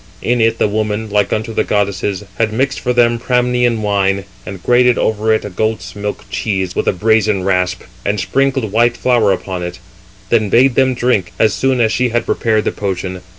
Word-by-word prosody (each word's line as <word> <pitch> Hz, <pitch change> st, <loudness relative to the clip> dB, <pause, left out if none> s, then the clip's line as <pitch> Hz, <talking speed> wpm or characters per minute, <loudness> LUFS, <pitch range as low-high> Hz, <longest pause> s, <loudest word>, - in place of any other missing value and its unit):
In 120 Hz, 0 st, +1 dB
it 115 Hz, 0 st, +2 dB
the -, -, +2 dB
woman, 105 Hz, 0 st, -2 dB
like 105 Hz, -1 st, +1 dB
unto 110 Hz, +1 st, -2 dB
the -, -, +1 dB
goddesses, 100 Hz, -1 st, -1 dB, 0.2 s
had 110 Hz, -2 st, +1 dB
mixed 130 Hz, +5 st, -1 dB
for 125 Hz, -, -1 dB
them 120 Hz, -1 st, +3 dB
Pramnian 125 Hz, -2 st, +1 dB
wine, 100 Hz, -1 st, +1 dB, 0.2 s
and 95 Hz, -2 st, -8 dB
grated 125 Hz, 0 st, +3 dB
over 110 Hz, 0 st, 0 dB
it 110 Hz, -, +1 dB
a -, -, -4 dB
goat's 95 Hz, -2 st, -3 dB
milk 105 Hz, 0 st, -5 dB
cheese 95 Hz, -1 st, -2 dB
with -, -, -1 dB
a -, -, +5 dB
brazen 105 Hz, 0 st, +1 dB
rasp, 90 Hz, -1 st, 0 dB, 0.2 s
and 105 Hz, 0 st, -1 dB
sprinkled 130 Hz, +4 st, 0 dB
white 120 Hz, +2 st, +2 dB
flour 120 Hz, -5 st, +2 dB
upon 95 Hz, -1 st, -3 dB
it: 90 Hz, 0 st, -5 dB, 0.5 s
then 110 Hz, -3 st, +2 dB
bade 125 Hz, +5 st, +4 dB
them 130 Hz, 0 st, +2 dB
drink, 120 Hz, -7 st, 0 dB
as 110 Hz, -3 st, +3 dB
soon 130 Hz, +7 st, 0 dB
as 110 Hz, -2 st, +2 dB
she 125 Hz, 0 st, +1 dB
had 120 Hz, 0 st, -1 dB
prepared 110 Hz, -2 st, +1 dB
the -, -, +1 dB
potion. 95 Hz, -2 st, -4 dB
110 Hz, 195 wpm, -16 LUFS, 100-120 Hz, 0.5 s, a